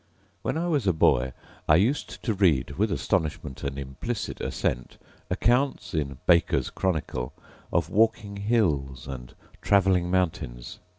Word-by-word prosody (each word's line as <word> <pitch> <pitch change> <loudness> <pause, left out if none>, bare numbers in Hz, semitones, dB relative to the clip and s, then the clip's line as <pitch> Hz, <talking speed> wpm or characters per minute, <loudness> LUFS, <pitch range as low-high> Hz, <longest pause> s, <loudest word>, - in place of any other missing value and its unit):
When - - -1
I 170 +2 -1
was 145 - +1
a 95 - +4
boy 65 -4 +3 0.4
I 75 - +6
used 115 - 0
to 115 - +1
read, 90 -9 +2
with - - 0
astonishment 75 -4 -1
and 70 0 -3
implicit 70 - -4
assent, - - -2 0.3
accounts 125 -2 +1
in 70 -4 -2
Baker's 70 -7 +3
Chronicle 75 -9 -2 0.4
of - - 0
walking 105 -2 +2
hills 80 - 0
and 60 -3 -8 0.3
travelling 95 -3 +3
mountains. 80 -10 -2
85 Hz, 130 wpm, -26 LUFS, 65-105 Hz, 0.4 s, I